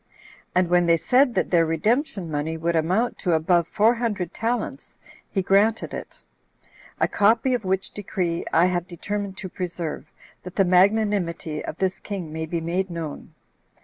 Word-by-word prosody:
And 180 0 +3
when 175 0 +3
they 170 0 +5
said 250 - +3
that - - 0
their 170 -2 +5
redemption 195 - 0
money 155 +2 -2
would 170 +1 -1
amount 185 +9 +1
to 180 -4 0
above 170 +1 +2
four 220 +6 +3
hundred 210 -8 -2
talents, 235 +2 -3 0.3
he 195 - -1
granted 205 +4 +2
it. - - -8 0.8
A - - +3
copy 225 +5 +3
of 240 -5 -1
which 190 +1 -1
decree 180 -4 -2
I 170 - +5
have 180 -1 0
determined 200 +2 -4
to 200 - -6
preserve, 170 -4 -5 0.3
that 180 0 -10
the 195 - +3
magnanimity 180 -4 +2
of 155 - -6
this 190 -1 -1
king 185 -7 -6
may 160 0 -4
be 170 +1 -2
made 180 +3 -1
known. 165 -4 -7
180 Hz, 165 wpm, -24 LUFS, 170-205 Hz, 0.8 s, they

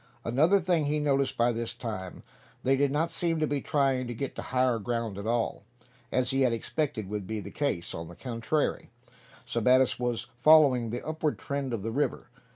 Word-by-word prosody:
Another 155 +12 +4
thing 170 -3 +1
he 150 +1 0
noticed 140 -2 +1
by 120 +1 +3
this 115 0 -3
time. 95 -6 -6 0.4
They 135 +1 +3
did 140 +1 +2
not 160 +3 0
seem 165 -1 0
to 155 - +2
be 145 -2 -1
trying 135 -3 +1
to 120 - -5
get 135 +4 -4
to - - -5
higher 125 -2 +1
ground 115 -1 -2
at 100 - -5
all, 115 0 0 0.5
as 125 -1 +1
he 135 0 +1
had 125 -3 +3
expected 115 -3 -2
would 105 -1 -4
be 110 +1 -3
the - - -8
case. 140 - -2
On 80 0 -6
the 85 - -11
contrary, 125 +5 -2 0.6
Sebattis 125 +2 +3
was 120 -1 -1
following 135 -5 +6
the 120 +2 -5
upward 155 -1 -1
trend 140 -2 -3
of 115 -4 -3
the 115 - -2
river. 145 +5 -2
130 Hz, 195 wpm, -28 LUFS, 115-145 Hz, 0.6 s, following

